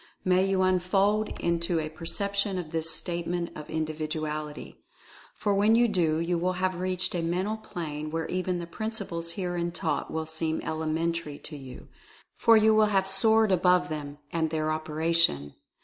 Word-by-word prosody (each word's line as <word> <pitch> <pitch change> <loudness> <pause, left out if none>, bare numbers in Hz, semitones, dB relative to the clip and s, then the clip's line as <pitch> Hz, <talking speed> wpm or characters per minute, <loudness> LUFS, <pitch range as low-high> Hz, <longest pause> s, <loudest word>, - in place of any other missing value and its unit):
May 185 +1 +3
you 190 -1 +2
unfold 195 +3 +1
into 170 0 0
a 155 - -2
perception 195 +5 -1
of 165 -4 -5
this 165 0 -1
Statement 170 0 -2
of 150 - -9
Individuality. 155 -1 -4 0.5
For 205 - 0
when 210 +3 +4
you 240 +1 +5
do, 170 -7 +1
you 170 +1 0
will 180 +2 0
have 185 +1 0
reached 185 0 -1
a 175 - -1
mental 185 +6 -1
plane 155 -7 -5
where 165 +1 -2
even 185 0 -1
the 170 - -4
principles 170 -3 -4
herein 175 -2 -2
taught - - -2
will 160 0 -3
seem 160 0 -2
elementary 160 -1 -2
to 150 - -9
you 135 -3 -10 0.3
— - - -28
for 230 -1 +7
you 220 0 +5
will 215 0 +5
have 195 -2 +1
soared 220 +2 +5
above 180 0 +3
them 145 -2 -5 0.2
and 160 -1 +1
their 155 0 -1
operation. 155 - +1
170 Hz, 165 wpm, -28 LUFS, 160-190 Hz, 0.5 s, for